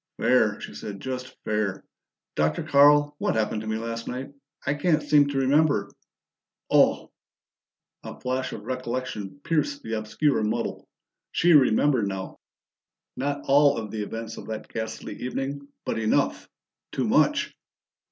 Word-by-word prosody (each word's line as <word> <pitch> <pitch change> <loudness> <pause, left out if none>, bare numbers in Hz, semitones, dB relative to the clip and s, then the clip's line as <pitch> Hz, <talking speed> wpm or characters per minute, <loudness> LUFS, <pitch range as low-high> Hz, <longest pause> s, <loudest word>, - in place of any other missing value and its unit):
"Fair," - - +3
she - - -8
said. 100 -2 -7
"Just 130 +2 -5
fair. 105 -3 -1 0.5
Dr. 75 0 0
Carl, 145 +1 +5
what - - 0
happened 110 -1 0
to 110 - -7
me 110 0 -1
last 115 0 -5
night? 130 +3 -5 0.3
I 140 - +2
can't 150 +1 +1
seem 145 -1 +5
to 140 -1 -3
remember 140 -4 +2 0.8
Oh!" - - +4 0.9
A - - -9
flash 130 +1 -2
of 105 - -7
recollection 125 -2 -4
pierced 150 -3 0
the 110 - -5
obscure 110 +7 +1
muddle. 105 0 -2 0.4
She 175 +1 +4
remembered 130 -4 +4
now 95 -1 -5 0.8
not 145 +1 -2
all 140 0 +5
of 110 -3 -5
the 110 - -3
events 115 +2 -5
of - - -9
that 110 -1 -6
ghastly 110 0 -5
evening, 140 +2 -4 0.2
but - - -1
enough. 110 -1 0 0.4
Too - - -1
much! - - +2
125 Hz, 140 wpm, -26 LUFS, 110-140 Hz, 0.9 s, Carl